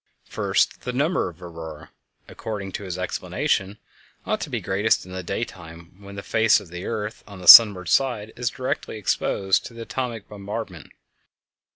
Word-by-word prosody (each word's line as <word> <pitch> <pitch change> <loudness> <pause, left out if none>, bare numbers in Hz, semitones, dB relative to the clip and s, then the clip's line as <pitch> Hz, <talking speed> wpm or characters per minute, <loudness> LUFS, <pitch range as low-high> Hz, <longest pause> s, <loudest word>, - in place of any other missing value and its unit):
First, - - 0
the 125 - -5
number 150 - 0
of 85 - -15
auroræ, 80 -3 -9 0.4
according 100 -3 -6
to 100 - -6
his 90 -1 -5
explanation, 95 +2 -2 0.5
ought - - -1
to - - -4
be - - -2
greatest 100 +2 0
in 90 - -12
the 95 0 -5
daytime, 85 -4 -7
when 100 0 -11
the 100 - -7
face 110 -1 +3
of 90 - -14
the 90 +2 -7
earth 110 -1 -5
on 100 -2 -11
the 90 - -9
sunward 100 -3 +10
side 110 -2 0
is 120 -1 -1
directly 130 -3 -4
exposed 95 -1 0
to 115 - -15
the 115 - -7
atomic 120 -3 -5
bombardment. 100 -4 -7
100 Hz, 170 wpm, -23 LUFS, 90-115 Hz, 0.5 s, sunward